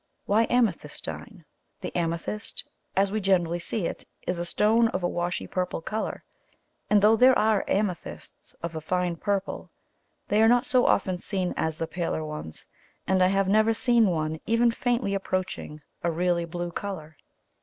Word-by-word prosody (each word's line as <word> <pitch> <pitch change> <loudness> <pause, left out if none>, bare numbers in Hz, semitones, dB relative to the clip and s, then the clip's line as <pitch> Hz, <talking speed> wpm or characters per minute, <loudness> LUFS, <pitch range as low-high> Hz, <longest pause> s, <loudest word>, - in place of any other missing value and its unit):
Why 220 +3 +3
amethystine? 245 -2 -2 0.4
The - - -6
amethyst, 170 +5 -3 0.3
as 195 0 +3
we 215 +1 -1
generally 175 -3 +2
see 175 +2 -2
it, - - -4 0.2
is 180 -1 -1
a 175 - -2
stone 220 +6 +3
of 185 -5 -3
a - - +3
washy 175 0 -2
purple 180 -2 -2
colour, 215 +6 -4 0.7
and 210 -1 +4
though 215 +2 +7
there 255 +3 +6
are 215 -2 +3
amethysts 195 -4 -3
of 170 -1 -4
a 160 - -4
fine 180 +1 0
purple, 200 +2 -2 0.6
they 210 +1 +3
are 225 - +6
not 245 +1 +4
so 250 -1 +3
often 185 -2 +2
seen 185 -2 -1
as 160 -1 -1
the 165 - -1
paler 165 -2 -3
ones, 150 - -7 0.4
and 190 -1 +2
I 185 - +6
have 195 0 +2
never 220 +3 +4
seen 235 -2 +4
one 160 -3 -1
even 230 +2 +4
faintly 240 -3 0
approaching 185 -5 -3 0.2
a 170 - +2
really 170 +1 +1
blue 175 +1 -4
colour. 170 -5 -6
185 Hz, 165 wpm, -26 LUFS, 170-215 Hz, 0.7 s, though